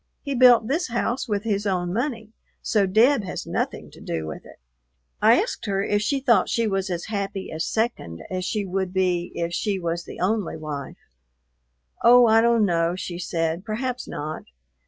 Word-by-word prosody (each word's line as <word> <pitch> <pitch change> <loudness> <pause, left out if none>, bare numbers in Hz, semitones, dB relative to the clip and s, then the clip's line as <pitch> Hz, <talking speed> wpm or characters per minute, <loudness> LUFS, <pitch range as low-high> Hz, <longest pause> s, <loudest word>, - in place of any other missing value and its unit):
He 280 - -3
built 240 -3 +6
this 320 +8 0
house 240 +2 -2
with 205 -2 -1
his 210 -2 -1
own 180 -2 -1
money, 225 -2 -3 0.3
so 205 -4 +2
Deb 225 +5 +4
has 185 - -5
nothing - - -3
to - - -15
do 80 -1 -3
with 80 - -8
it." - - -14 0.7
I 225 +6 +6
asked 410 - -3
her 195 -1 0
if 205 0 +1
she 275 +6 0
thought 235 -8 +3
she 230 - +1
was 195 -1 -1
as 175 -1 -3
happy 200 -2 -4
as 160 +1 -3
"second" 85 - -2
as 185 0 -2
she 205 +2 -2
would 190 0 -2
be 180 -2 0
if 170 0 -2
she 200 +2 -1
was 170 -1 -3
the - - -10
only 200 -2 -1
wife. 150 -3 -6 1.1
"Oh, 245 +1 +8
I 225 0 +5
don't 230 -2 +3
know," 170 -1 +1
she 175 -1 -5
said, 165 0 -2
"perhaps 245 +3 -3
not. 155 +1 -5
200 Hz, 185 wpm, -24 LUFS, 175-230 Hz, 1.1 s, Oh